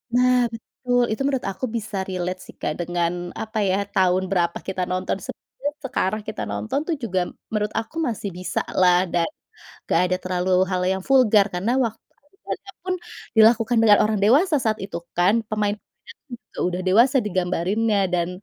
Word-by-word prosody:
Nah 250 -1 +4
betul 245 +2 -1
itu 220 - -5
menurut 270 -2 0
aku 195 +6 -3
bisa 215 -2 -5
relate 185 0 -3
sih - - -14
Kak 150 - -1
dengan 175 0 -1 0.2
apa 220 0 -5
ya, 200 0 +1
tahun 185 0 +2
berapa 170 -3 +1
kita 190 -1 -2
nonton, 185 +1 -1
sebenarnya 285 +9 -6
sekarang 215 -4 -1
kita - - -5
nonton 100 - -2
tuh 335 - 0
juga 190 -5 0 0.3
menurut 210 -1 0
aku 225 +6 -4
masih 215 -3 -3
bisalah, 180 0 +1
dan 170 -1 +1 0.5
nggak 165 - +2
ada 185 - +1
terlalu 185 0 -1 0.2
hal 185 - +1
yang 190 0 0
vulgar, 230 -6 +5
karena 180 +6 -1
waktu 230 -4 0 0.2
adegannya 390 +4 -8 0.2
pun 370 - +1 0.4
dilakukan 225 +1 +5
dengan 210 -2 +7
orang 215 -1 0
dewasa 300 - +4
saat 215 -1 0
itu 195 -1 -5
kan, 200 +6 +2
pemainnya 210 -1 -1 0.5
itu 235 - -16
sudah 180 0 -2
dewasa 230 +9 +4
digambarinnya 195 +3 0
dan 175 -1 0
205 Hz, 165 wpm, -23 LUFS, 185-230 Hz, 0.5 s, dengan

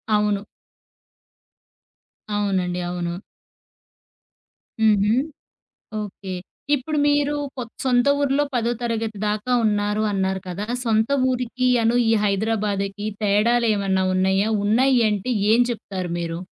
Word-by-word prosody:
అవును. 210 -1 +1 1.9
అవునండి. 185 -3 0
అవును. 175 0 -3 1.6
హుహు. 210 0 +4 0.9
ఓకే. 195 -2 -7 0.4
ఇప్పుడు 300 +3 -3
మీరు 290 0 +2 0.2
కొత్ 235 -2 -6
సొంత 250 0 +3
ఊరిలో 285 +1 +2
పదో 235 0 +1
తరగతి 225 -2 -2
దాకా 215 +4 -1
ఉన్నారు 210 0 +1
అన్నారు 190 -1 -1
కదా! 190 +4 -4 0.2
సొంత 220 +1 +1 0.2
ఊరికి 255 0 -1 0.2
అను 230 +2 +2
ఈ - - +4
హైదరాబాదుకి 205 -1 -1 0.2
తేడాలు 230 +4 +3
ఏమన్నా 190 -1 0
ఉన్నయా? 190 +2 +2 0.2
ఉన్నయి 250 +3 +3
అంటే, 210 +4 -2 0.2
ఏం 240 - +5
చెప్తారు 185 -6 -5
మీరు? 165 0 -4
210 Hz, 105 wpm, -22 LUFS, 195-240 Hz, 1.9 s, ఏం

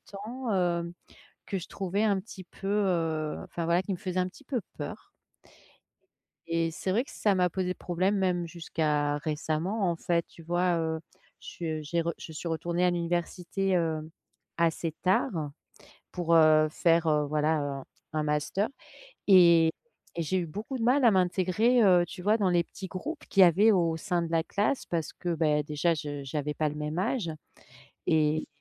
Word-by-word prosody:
temps 230 +5 -6
hem, 170 -2 0 0.5
que 195 - -2
je 175 - -7
trouvais 195 +2 -1
un 200 -3 +2
petit 190 -1 -10
peu, 195 +2 -9
heu, 165 -7 0
enfin, 170 - -5
voilà, 170 +2 +3
qui 195 - -2
me - - -4
faisait 185 +1 -3
un 180 - +1
petit 200 - -14
peu 255 -2 -2 0.2
peur - - -7 1.4
et 165 0 0
c'est 185 +3 -4
vrai 225 +7 +2
que - - -14
ça 205 -2 +1
m'a 180 -1 +2
posé 180 0 -2
problème 185 +3 0
même 180 -2 0
jusqu'à 155 -3 -1
récemment, 160 +6 -1
en 170 - -2
fait, 170 0 0
tu 165 - -15
vois, 175 +1 +1
heu? 160 0 -2 0.4
Je 160 -2 -5
j'ai 170 +3 -1
re 170 0 -1
je 160 - -9
suis 165 +2 -5
retournée 170 +2 -1
à 180 - +4
l'université, 175 +2 -1
heu, 160 -2 -1 0.5
assez 165 -1 0
tard 185 +1 +2 0.8
pour, 170 -2 +1
heu, 155 -1 +6
faire, 165 0 +2
heu, 150 -1 +2
voilà, 155 +1 +1
heu, 145 - -2
un 135 -1 -6 0.3
un 155 - +1
master 150 +7 0 0.6
et 170 -4 +7 0.4
et 170 - -2
j'ai 185 +5 0
eu 175 - -2
beaucoup 215 - -5
de 230 - -3
mal 255 +2 +4
à 230 - +7
m'intégrer, 190 +6 +2
heu, 180 -3 +6
tu 180 - -9
vois, 210 +4 +3
dans 195 -3 +2
les 175 -1 +3
petits 190 +3 -8
groupes 280 - -6
qu'il 195 - +4
y - - +11
avait 200 +6 +5
au 170 -5 +2
sein 175 +1 -1
de 170 - -3
la 165 -1 +2
classe 210 +9 -1
parce 165 -3 -3
que 175 - -5
beh, 150 -2 +2
déjà 150 +3 +1
je 145 -2 -5
j'avais 150 +2 -3
pas 155 +1 0
le 150 - -7
même 150 +2 -3
âge 190 -3 -1 0.8
et 155 0 +2
170 Hz, 185 wpm, -28 LUFS, 160-190 Hz, 1.4 s, y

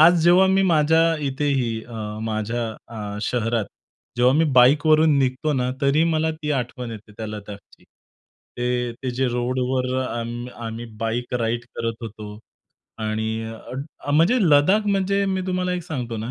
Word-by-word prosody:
आज 170 +1 +7
जेव्हा 180 +2 +6
मी 190 0 +3
माझ्या 160 -2 +4 0.2
इथेही 135 -3 0
अ, 120 - -11 0.3
माझ्या 110 +2 -2 0.2
अ, 105 -3 -6
शहरात 115 -1 0 0.5
जेव्हा 125 +2 +4
मी 160 - +4
बाईकवरून 150 +3 +5
निघतो 135 +3 0
ना, 125 -2 0
तरी 145 +3 +3
मला 160 -1 +1
ती 150 - -2
आठवण 125 -2 -3
येते 105 -1 -10
त्या 110 - -5
लद्दाखची. 105 -1 -10 0.7
ते-ते 125 +1 -2
जे 125 +1 0
रोडवर 125 +1 -1
आम 120 +1 -4 0.2
आम्ही 115 +1 -5 0.2
बाईक 120 +2 -2
राइड 115 +1 -1
करत 115 0 -2
होतो. 105 -1 -8 0.6
आणि 110 0 -2 0.8
अ, - - -1
म्हणजे 165 +11 +4
लद्दाख 185 +6 +4
म्हणजे 200 0 +1
मी 190 -1 0
तुम्हाला 180 0 -1
एक 180 -1 -2
सांगतो 125 -9 -4
ना, 110 +2 -4
125 Hz, 145 wpm, -23 LUFS, 115-155 Hz, 0.8 s, आज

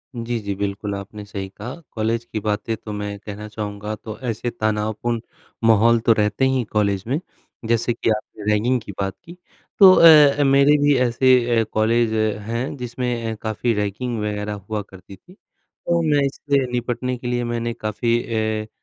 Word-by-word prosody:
जी, 120 0 -3
जी, 100 -2 -4
बिल्कुल 100 +1 -3
आपने 100 +2 -8
सही 100 -1 -6
कहा। 105 +6 -8 0.2
कॉलेज 115 +1 -1
की 110 - -4
बातें 105 +1 -2
तो 110 - -9
मैं 105 0 -4
कहना 105 +1 -8
चाहूँगा 105 0 -5
तो 110 0 -9
ऐसे 115 +2 -2
तनावपूर्ण 110 +1 -1 0.5
माहौल 115 +1 +5
तो 115 - +6
रहते 105 +4 +1
ही 130 0 +2
हैं 125 - -1
कॉलेज 100 -3 +1
में, 135 +5 0 0.5
जैसे 115 +1 +1
कि 115 - -1
आपने 105 -1 -3
रैगिंग 120 +5 +2
की 100 - -8
बात 95 -1 -1
की। 170 +2 -12 0.4
तो 195 -2 +10
अ 170 - +6 0.3
अ, - - +4
मेरे 140 +2 +5
भी 145 0 +4
ऐसे 120 -1 +3
अ, - - +3
कॉलेज 110 +1 +2 0.3
हैं 115 +5 -3
जिसमें 125 0 -4 0.2
ए - - -4
काफ़ी 110 +2 -1
रैगिंग 105 +4 -2
वगैरह 105 0 -3
हुआ 105 +1 -5
करती 95 +1 -13
थी। 180 - -20
तो 170 -3 -5
मैं 150 -3 +2
इससे 140 0 0
निपटने 125 +1 -2
के 120 - -7
लिए 120 0 -1
मैंने 120 0 -2
काफ़ी 115 +2 -1
ए, 110 -2 -2
115 Hz, 180 wpm, -21 LUFS, 105-120 Hz, 0.5 s, तो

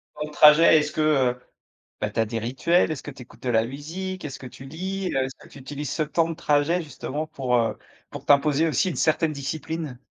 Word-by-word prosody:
temps 150 - -4
de - - -11
trajet, 150 +2 +7
est-ce 150 0 -2
que, - - -2
heu, 130 -5 +2 0.6
bah, - - 0
tu - - -4
as 110 - +3
des 115 +1 -3
rituels? 135 +11 +1
Est-ce 155 - -5
que 145 - -7
tu 135 - -13
écoutes 120 - -19
de 125 - -1
la 110 -1 +3
musique? 165 +8 -6
Est-ce 140 - -6
que 130 - -8
tu 130 +2 -12
lis? 185 +6 -4
Heu, 135 - +2
est-ce 130 - -8
que - - -17
tu - - -13
utilises 145 +1 -6
ce 155 - 0
temps 160 +2 0
de - - -2
trajet 155 +2 +1
justement 150 0 -5
pour, 130 -5 -1
heu, 115 -1 0 0.3
pour - - -9
t'imposer 145 +2 +4
aussi 175 +4 +1
une 175 - -4
certaine 155 0 +1
discipline? 145 -1 -5
150 Hz, 235 wpm, -24 LUFS, 135-160 Hz, 0.6 s, trajet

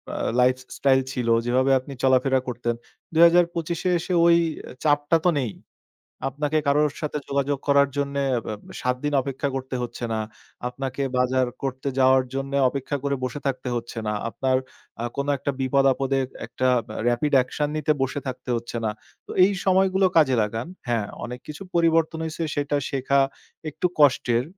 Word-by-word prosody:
আ - - -3 0.2
life 125 +1 +5 0.2
style 135 -1 +4
ছিল, 125 -3 -3 0.2
যেভাবে 130 +2 +2
আপনি 135 +2 -9
চলাফেরা 130 0 +4
করতেন, 120 -1 -2 0.4
২০২৫ 170 0 +4 0.2
এসে 180 +2 -3
ওই 170 0 +7 0.5
চাপটা 145 +2 +3
তো - - +6
নেই। 120 -6 -2 0.8
আপনাকে 150 +3 -1
কারোর 145 0 +3
সাথে 150 0 -2
যোগাযোগ 140 0 0
করার 140 0 +5
জন্যে 140 0 -1 0.2
এব - - -8 0.4
৭ 125 0 0
দিন 145 - 0
অপেক্ষা 140 +1 -3
করতে 130 0 -5
হচ্ছে 120 0 -5
না। 110 - -1 0.5
আপনাকে 135 +2 -4 0.2
বাজার 130 0 +2 0.2
করতে 135 +1 -3
যাওয়ার 130 0 +5
জন্যে 135 +1 -2
অপেক্ষা 140 +2 -3
করে 140 -1 0
বসে 140 +3 -4
থাকতে 130 -1 -2
হচ্ছে 120 0 -5
না। 105 - 0 0.2
আপনার 130 +2 0 0.5
আ - - -2
কোনো 140 +1 -1
একটা 140 - -2
বিপদ-আপদে 135 0 +2 0.3
একটা 130 - -1 0.4
রেপিড 120 +5 0
অ্যাকশন 140 +3 0
নিতে 155 0 +2
বসে 135 +2 -1
থাকতে 125 -1 -5
হচ্ছে 120 0 -5
না। 110 - +1 0.4
তো - - -12
এই 200 - +3
সময়গুলো 190 0 +3
কাজে 145 -5 +5
লাগান। 115 +3 -3 0.2
হ্যাঁ, 115 -4 0 0.2
অনেক 125 +1 -6
কিছু 150 +5 -8
পরিবর্তন 165 -1 +2
হইছে 160 +1 -4
সেটা 145 0 0
শেখা 140 +1 +2 0.5
একটু 180 - -1
কষ্টের। 125 -4 +4
135 Hz, 160 wpm, -24 LUFS, 130-145 Hz, 0.8 s, ওই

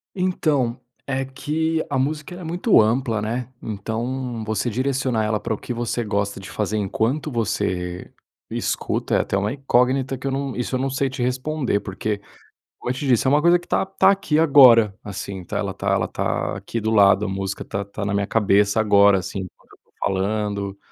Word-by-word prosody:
Então 150 -10 0 0.3
é 135 0 -1
que 160 +4 -1
a 140 - 0
música, 150 +6 -2
ela 180 - -9
é - - -8
muito 175 +7 +3
ampla, 115 0 +1
né? 120 +4 -3
Então 115 +3 -4
você 110 +2 -1
direcionar 130 -1 0
ela 105 0 0
para 115 +1 -2
o - - -3
que 125 - -5
você 120 0 -2
gosta 100 -1 -2
de 95 - -9
fazer 105 0 -1
enquanto 115 +9 -1
você 90 -6 -2 0.4
escuta - - -1
é - - +5
até - - -3
uma 100 +2 0
incógnita 135 0 +1
que 135 +2 -5
eu - - 0
não 135 -1 -3
isso 125 +1 -2
eu - - 0
não 135 +1 0
sei 135 0 0
te 130 -1 -4
responder, 130 -2 -1
porque, 100 +1 -3 0.6
como 125 - -4
eu - - +3
te 140 +2 -4
disse, 125 -1 +3
é 130 - +4
uma 145 +1 +4
coisa 175 +2 +5
que 175 - -18
tá - - +1
tá 195 0 +4
aqui 195 -6 +1
agora, 125 -9 +7
assim, 100 -2 -6
tá - - -3
ela - - -2
tá - - -3
ela - - +1
tá - - -2
aqui 115 - -4
do 110 +1 -1
lado. 100 -1 +5
A - - -4
música 95 0 -3
está 100 +1 -5
na 100 - -1
minha 100 0 0
cabeça 105 0 +3
agora, 100 -2 +5
assim, 90 +2 -5
enquanto 90 - -11
eu - - -17
estou - - -39
falando, 100 0 -1
115 Hz, 205 wpm, -22 LUFS, 100-135 Hz, 0.6 s, agora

